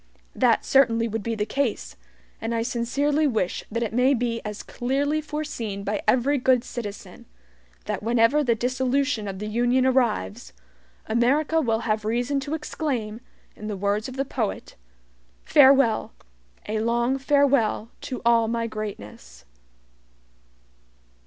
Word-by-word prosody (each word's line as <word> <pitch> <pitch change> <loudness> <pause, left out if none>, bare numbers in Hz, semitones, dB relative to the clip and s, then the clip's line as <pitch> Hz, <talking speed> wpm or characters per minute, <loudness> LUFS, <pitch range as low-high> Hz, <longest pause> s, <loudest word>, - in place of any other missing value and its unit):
That - - +2
certainly 230 -4 +3
would 225 0 -3
be 230 +2 -3
the 210 -1 -1
case, 265 0 -2 0.5
and 230 +1 -2
I 225 - 0
sincerely 280 +6 0
wish 215 -8 -1
that 230 +2 -2
it 220 - -4
may 255 +3 +3
be 235 -1 -2
as 210 -1 -6
clearly 285 +5 -1
foreseen 290 -10 -5
by 205 +1 -2
every 270 +3 +3
good 250 -1 +3
citizen, 215 -5 -8 0.6
that - - -3
whenever 230 +6 +3
the 235 -4 +2
dissolution 255 0 0
of 195 -1 -5
the 210 - -5
Union 240 +4 +1
arrives, 235 - 0 0.5
America 280 +8 +2
will 225 -5 0
have 215 -2 -1
reason 245 +6 0
to 285 +3 -3
exclaim, 250 -8 -4 0.3
in 215 - -8
the 210 -2 -4
words 205 +4 -1
of 260 - -9
the 275 - 0
poet: 230 -6 -4 0.7
"FAREWELL! 270 -5 +4 0.5
A 215 +1 -1
LONG 235 +4 0
FAREWELL 275 -6 +2
TO 255 - -6
ALL 230 -1 +4
MY 230 0 -1
GREATNESS." 105 - -8
235 Hz, 140 wpm, -24 LUFS, 215-270 Hz, 0.7 s, FAREWELL